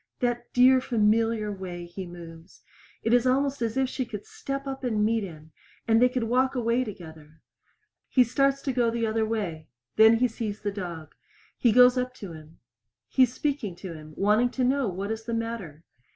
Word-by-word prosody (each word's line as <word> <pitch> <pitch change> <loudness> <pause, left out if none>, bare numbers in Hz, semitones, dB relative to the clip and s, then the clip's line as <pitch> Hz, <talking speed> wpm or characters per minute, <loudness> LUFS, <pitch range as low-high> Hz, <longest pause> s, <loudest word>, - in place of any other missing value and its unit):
That 240 -1 -2
dear 255 +1 +5
familiar 225 -2 +1
way 180 -3 -6
he 180 +2 -8
moves! 170 -1 -12 0.4
It 225 - +1
is 245 +1 +4
almost 275 +1 +1
as 230 +1 -1
if 265 -1 +2
she 260 +1 -3
could 220 -4 -8
step 275 0 -5
up 270 0 -6
and 215 -4 +1
meet 225 0 +1
him, 160 -4 -10 0.4
and 225 0 +4
they 250 - +6
could 250 -1 -2
walk 255 +4 +1
away 240 +1 +1
together. 160 -7 -11 0.7
He 255 - +5
starts 275 +3 +1
to 270 - -1
go 240 -2 +2
the 230 0 -1
other 220 0 0
way. 180 -8 -3 0.3
Then 220 +1 +7
he 250 +2 +2
sees 215 -3 -5
the 205 -1 -2
dog. 170 -6 -7 0.4
He 240 - +3
goes 250 +2 +6
up 250 0 -3
to 195 -8 -8
him; 155 0 -13 0.5
he - - +1
is 250 -1 +4
speaking 280 - -2
to 180 -1 -8
him, 155 -1 -12
wanting 215 +5 +3
to 255 - -2
know 260 -2 +1
what 195 +3 -4
is 220 0 -5
the 230 -1 -2
matter. 225 -9 -5
225 Hz, 195 wpm, -26 LUFS, 190-250 Hz, 0.7 s, Then